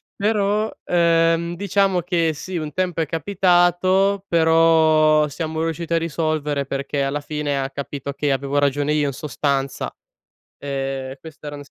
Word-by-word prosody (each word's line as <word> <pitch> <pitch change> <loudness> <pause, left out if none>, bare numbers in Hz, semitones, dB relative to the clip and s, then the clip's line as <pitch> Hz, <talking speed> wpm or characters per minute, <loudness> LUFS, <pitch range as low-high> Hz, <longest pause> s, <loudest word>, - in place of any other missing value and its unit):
però, 210 +1 0
ehm, 170 0 +2
diciamo 195 -1 +1
che 170 -1 +1
sì 185 +5 -7
un 155 -3 -3
tempo 180 -1 -1
è - - +1
capitato 185 +3 +2
però 160 -2 +4
siamo 160 +2 -4
riusciti 165 +1 -4
a 165 - +4
risolvere 155 -3 -1
perché 140 +1 -2
alla 135 +2 -1
fine 145 -1 -3
ha 135 - -2
capito 140 0 -5
che 145 +1 -1
avevo 140 +1 -1
ragione 145 +1 +1
io 150 -1 +1
in 140 - -3
sostanza. 140 -1 -2 0.7
Ehm, 135 -1 -4
questa 155 -2 -12
era 145 - -6
155 Hz, 145 wpm, -21 LUFS, 145-175 Hz, 0.7 s, però